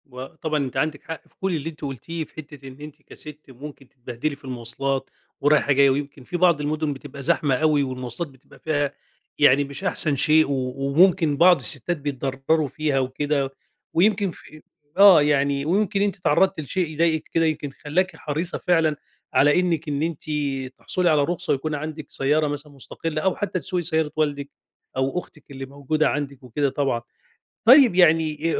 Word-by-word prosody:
وطبعًا 150 +4 -5
أنتِ 130 0 -6
عندِك 150 +1 -1
حق 165 -1 -8
في - - -33
كل 190 -2 0
اللي 155 +1 -3
أنتِ 155 - -14
قُلتيه، 150 +4 -5
في - - -16
حتة 145 -3 -10
إن 130 0 -11
أنتِ 150 0 -11
كست 150 0 -12
ممكن 135 +1 -11
تتبهدلي 125 +3 -5
في 140 - -18
المواصلات 130 +2 -3 0.3
ورايحة 145 0 +3
جاية، 140 0 +5
ويمكن 140 0 -3
في 175 - -4
بعض 170 -4 +3
المدن 150 0 -1
بتبقى 140 0 -10
زحمة 135 0 +1
أوي 150 0 +2
والمواصلات 130 +3 -5
بتبقى 130 -2 -20
فيها 145 -3 -1 0.5
يعني 145 -1 +5
مش 140 +5 -7
أحسن 160 -6 +2
شيء، 155 +3 +4
و 130 -2 -2
وممكن 155 +2 +3
بعض 175 +3 +7
الستات 155 +5 +2
بيتضرروا 140 +2 -1
فيها 150 -1 -1
وكده، 135 +1 -1 0.4
ويمكن 200 +2 +2
في 155 -2 -15 0.4
آه، 195 -5 +8
يعني 140 -1 +1
ويمكن 195 +3 +1
أنتِ 205 0 0
اتعرضتِ 190 -1 +2
لشيء 170 +4 -2
يضايقِك 160 0 +1
كده 165 0 +2
يمكن 155 -3 -2
خلّاكِ 185 +6 0
حريصة 160 +4 -4
فعلًا 165 -4 +2 0.4
على 145 +4 +4
إنِّك 170 -4 -1
إن 145 0 -2
أنتِ 160 -1 -4 0.5
تحصلي 180 -1 0
على 150 -2 +3
رخصة 175 +3 -1
ويكون 150 +3 -2
عندِك 155 0 -6
سيارة 150 +3 +1
مثلًا 145 0 -6
مستقلة 155 +3 -5
أو 190 +1 +1
حتى 200 -2 -2
تسوقي 180 0 -2
سيارة 160 -2 0
والدِك 145 -2 -1 0.5
أو 135 +6 0
أختِك 150 -4 -15
اللي 135 -1 -7
موجودة 140 +3 -1
عندِك 140 -2 -4
وكده 135 +3 -1
طبعًا، 135 -4 -1 0.6
طيب 255 -2 +7
يعني 160 -2 +3
أ - - 0
150 Hz, 170 wpm, -23 LUFS, 140-165 Hz, 0.6 s, آه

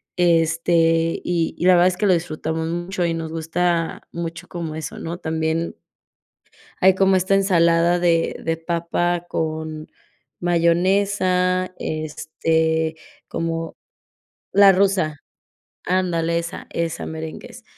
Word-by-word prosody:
este, 165 -1 +2
y 170 -2 -1
y - - -2
la 185 - +7
verdad 175 0 +5
es 180 -1 0
que 210 - 0
lo 190 - +5
disfrutamos 160 -1 -2
mucho 175 +2 -3
y 170 -1 0
nos 165 -1 -5
gusta 165 +1 -1
mucho 170 0 -6
como 165 -3 -5
eso, 160 - -6
¿no? 170 +1 -5
También 160 0 -2 1.0
hay 190 0 +5
como 195 0 +3
esta 185 +1 +2
ensalada 170 -3 +3
de 170 -1 +2
de 165 0 -1
papa 170 +1 -1
con 155 -1 -4 0.5
mayonesa, 185 +1 +1
este, 160 +1 -1 0.3
como 165 0 -3 0.8
la 200 0 +7
rusa. 185 -5 +1 0.7
Ándale, 170 -2 +1
esa, 170 +2 -6
esa 165 -1 -3
merengues. 160 0 -8
170 Hz, 120 wpm, -21 LUFS, 160-180 Hz, 1.0 s, la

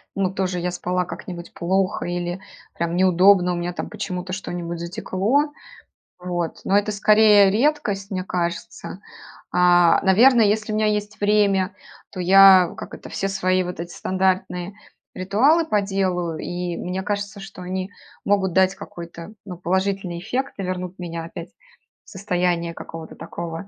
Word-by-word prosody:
ну, 190 -1 0
тоже 185 -2 -2
я 180 +1 -2
спала 180 0 -2
как-нибудь 175 0 -8
плохо 190 +3 -1
или 175 +1 -3 0.4
прям 170 +1 -2
неудобно, 185 0 +4
у - - -2
меня, 175 +1 -3
там, - - -5
почему-то 185 -3 -5
что-нибудь 175 -3 -5
затекло. 205 - -1 0.7
Вот. 175 -2 -4
Но 195 - +3
это, 205 +1 0
скорее, 210 -1 +5
редкость, 210 -5 0
мне 185 -1 -2
кажется. 175 +1 -4 0.5
А, 175 -1 +5
наверно, 230 +6 +6
если 215 +1 +1
у - - -1
меня 215 0 +1
есть 210 0 -2
время, 205 -2 +2 0.4
то 185 - -8
я, 190 -1 +7
как - - -8
это, - - -10
все 195 - -2
свои 185 -1 +1
вот 180 -2 -6
эти 175 +1 -6
стандартные 185 0 -1 0.4
ритуалы 245 - +3
поделаю, 190 - -1
и 175 -1 -4
мне 185 +1 -4
кажется, 205 0 -4
что 195 -1 -10
они 185 +1 -4 0.3
могут 195 -3 +1
дать 190 +1 +3
какой-то, 170 -1 -10
ну, 180 -3 -7
положительный 190 0 -1
эффект 255 +8 -3
и - - -2
вернут 185 0 -5
меня 170 -2 -5
опять 165 - -8 0.6
в - - -17
состояние 180 -3 -1
какого-то 165 -1 -9
такого 170 +2 -7
185 Hz, 150 wpm, -22 LUFS, 175-200 Hz, 0.7 s, я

